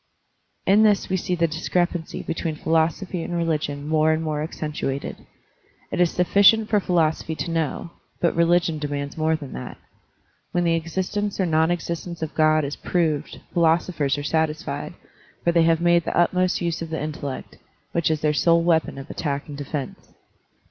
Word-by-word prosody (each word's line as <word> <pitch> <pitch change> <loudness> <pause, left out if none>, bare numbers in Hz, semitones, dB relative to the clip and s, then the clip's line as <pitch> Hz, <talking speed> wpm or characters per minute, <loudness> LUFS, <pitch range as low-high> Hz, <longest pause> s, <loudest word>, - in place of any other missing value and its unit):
In 200 +3 +5
this 210 -2 +3
we 190 - +1
see 180 0 -1
the 170 -1 +2
discrepancy 170 +1 -1
between 165 -1 -3
phi - - -17
losophy 165 +2 +1
and 175 - -4
religion 150 -3 -1
more 155 0 +3
and 160 +1 0
more 155 -2 -2
accentuated. 150 -3 -4 0.6
It - - 0
is 175 - +4
sufficient 200 +5 +4
for 210 - +4
philosophy 160 -3 0
to 170 - -4
know, 165 +1 -2 0.3
but 170 - +1
religion 170 -1 +2
demands 145 -1 -4
more 160 0 +1
than 145 -4 -7
that. 65 - -7 0.8
When 175 - +2
the 170 -1 +2
existence 190 +5 -2
or 190 - +3
non 160 -1 +2
existence 170 -1 -3
of 160 - -4
God 155 -1 +3
is 140 - -4
proved, 155 -4 -1
philosophers 165 -4 +2
are 145 - -4
satisfied, 155 0 -2 0.5
for 170 - +3
they 170 -1 +4
have 165 -1 +3
made 175 -1 +3
the - - -2
utmost 180 +1 +2
use 170 -1 -1
of 165 - -5
the 160 - -3
intellect, 145 -3 -5 0.3
which 170 -3 +1
is 155 -1 0
their 150 -1 +2
sole 170 +2 +3
weapon 160 -4 +1
of 135 +1 -8
attack 140 -3 -3
and 145 - -7
defense. 140 -1 -6
165 Hz, 175 wpm, -23 LUFS, 155-175 Hz, 0.8 s, In